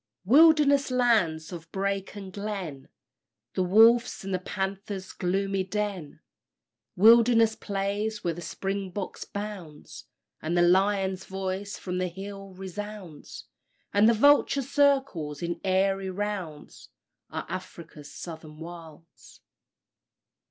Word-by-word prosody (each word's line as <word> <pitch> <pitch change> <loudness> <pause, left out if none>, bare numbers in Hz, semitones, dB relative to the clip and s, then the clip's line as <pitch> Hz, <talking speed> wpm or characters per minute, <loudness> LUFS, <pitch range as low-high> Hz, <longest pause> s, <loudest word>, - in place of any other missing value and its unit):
Wilderness 285 - +5
lands 215 -11 +1
of 165 -2 -9
brake 195 0 -2
and 195 -2 -8
glen, 195 -9 -5 0.6
The - - -1
wolf's 225 +6 +4
and 195 0 -4
the 185 - 0
panther's 195 0 -4
gloomy 195 +1 -1
den; 195 -5 -4 0.7
Wilderness 230 +2 +6
plains 205 +2 -3
where 170 - 0
the 175 - -8
springbok 195 +2 -4
bounds, 200 -7 -8 0.4
And 165 +3 -1
the 175 - +5
lion's 190 +1 +2
voice 190 +1 -4
from 180 -1 -4
the 185 - 0
hill 195 +1 -9
resounds, 195 -3 -8 0.5
And 205 +2 +5
the 235 - +4
vulture 285 +2 +4
circles 270 - +1
in 170 0 -3
airy 195 0 +1
rounds, 185 -6 -5 0.4
Are - - -5
Afric's 155 -3 -8
Southern 160 -2 -9
Wilds. 165 -1 -12
195 Hz, 110 wpm, -27 LUFS, 175-210 Hz, 0.7 s, Wilderness